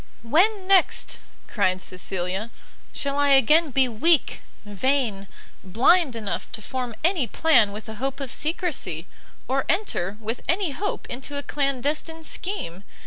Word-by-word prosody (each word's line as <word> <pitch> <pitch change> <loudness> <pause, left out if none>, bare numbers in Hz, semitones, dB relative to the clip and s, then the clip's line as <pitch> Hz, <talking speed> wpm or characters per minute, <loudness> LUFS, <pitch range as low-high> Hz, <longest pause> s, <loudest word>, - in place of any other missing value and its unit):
"When, 370 - +2
next," 385 -2 +3 0.3
cried 185 -4 0
Cecilia, 185 +3 -3 0.4
"shall 280 0 -2
I 285 0 +3
again 300 +5 +5
be 265 0 +3
weak, 290 +7 +2 0.2
vain, 210 -1 -1 0.4
blind 255 - +3
enough 215 -3 -4
to 220 - -5
form 250 0 -4
any 335 -7 +2
plan 245 -5 +4
with 210 +3 -8
a 220 - -6
hope 270 +1 -2
of 270 -3 -5
secresy? 305 - -2 0.4
or 270 +1 0
enter, 210 - -1
with 225 +2 -4
any 350 -1 +1
hope, 405 +9 -3
into 270 +3 -5
a 285 - -4
clandestine 290 +4 -2
scheme! 310 - -4
270 Hz, 140 wpm, -24 LUFS, 215-320 Hz, 0.4 s, again